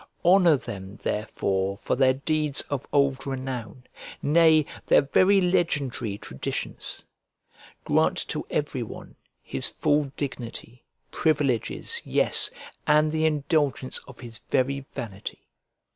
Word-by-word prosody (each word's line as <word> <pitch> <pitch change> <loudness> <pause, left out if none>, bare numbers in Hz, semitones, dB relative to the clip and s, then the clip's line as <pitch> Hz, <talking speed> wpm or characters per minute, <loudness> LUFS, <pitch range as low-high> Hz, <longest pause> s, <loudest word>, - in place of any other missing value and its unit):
Honour 175 -4 +6
them 100 -5 -8
therefore 100 -3 -2
for - - -1
their 130 0 +4
deeds 150 +1 +1
of 140 -3 -3
old 140 -1 +1
renown, 130 -3 -5 0.4
nay, 155 0 +5 0.2
their - - +5
very 185 +8 +4
legendary 145 - 0
traditions. 65 -9 -5 0.8
Grant - - +2
to - - -3
every - - -2
one - - -8 0.3
his 65 - 0
full 145 0 +1
dignity, 125 -3 -6 0.3
privileges, 145 -7 0
yes, - - +4 0.4
and 150 0 +4
the 160 0 +2
indulgence 145 -3 0
of 135 -3 -13
his 115 -3 -9
very 135 +1 0
vanity. 105 -3 -7
135 Hz, 115 wpm, -26 LUFS, 120-150 Hz, 0.8 s, Honour